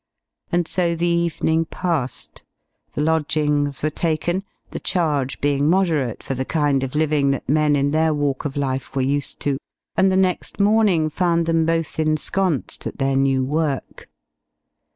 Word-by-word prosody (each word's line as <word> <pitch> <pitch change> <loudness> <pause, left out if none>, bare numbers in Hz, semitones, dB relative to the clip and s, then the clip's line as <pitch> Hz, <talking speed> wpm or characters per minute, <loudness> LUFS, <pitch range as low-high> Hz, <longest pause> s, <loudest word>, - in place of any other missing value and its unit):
And 175 -1 +1
so 170 -2 0
the 170 +1 -1
evening 170 -1 +1
passed. 160 -8 -3 0.5
The - - -1
lodgings 150 -2 0
were 155 - +1
taken, 170 +4 -1 0.3
the - - -5
charge 150 -7 -1
being 145 +1 +1
moderate 160 - +1
for - - -3
the 130 0 -2
kind 145 -2 +1
of 135 +1 -4
living 150 -2 +2
that 135 -2 -2
men 150 +1 +3
in 140 0 +1
their 160 +1 +2
walk 145 -3 -1
of 145 -1 -4
life 135 -1 -2
were 135 - +1
used 140 +2 -1
to, 140 -2 0 0.4
and 190 0 +4
the 185 - +2
next 185 +1 0
morning 200 -6 +3
found 170 -1 +1
them 165 -1 +2
both 165 -1 -1
ensconced 155 +1 -1
at - - -7
their 135 -1 +1
new 135 -1 +2
work. 150 -1 -2
155 Hz, 160 wpm, -21 LUFS, 140-170 Hz, 0.5 s, and